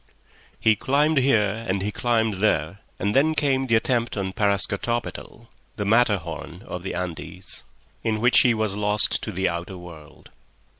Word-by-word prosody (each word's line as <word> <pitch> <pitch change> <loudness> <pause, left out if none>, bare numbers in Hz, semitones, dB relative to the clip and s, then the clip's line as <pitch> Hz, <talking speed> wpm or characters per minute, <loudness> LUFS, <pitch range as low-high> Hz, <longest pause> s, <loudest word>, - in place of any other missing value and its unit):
He 110 -1 +4
climbed 145 +5 +2
here 115 -4 +2
and 95 0 -1
he 105 - -1
climbed 110 -4 0
there, 100 -1 +1 0.2
and 100 +2 -1
then 155 +4 +3
came 135 -3 +1
the 115 - +3
attempt 115 0 0
on 95 -1 -2
Parascotopetl, 105 +3 -1 0.3
the 105 - -3
Matterhorn 105 -6 0
of - - -6
the - - -5
Andes, 85 0 -6 0.4
in 110 -1 -1
which 120 +2 +5
he 120 -2 +4
was 110 -3 -1
lost 105 0 +2
to 110 - -5
the 95 0 0
outer 85 +3 -4
world. 80 -4 -13
105 Hz, 155 wpm, -24 LUFS, 95-120 Hz, 0.4 s, which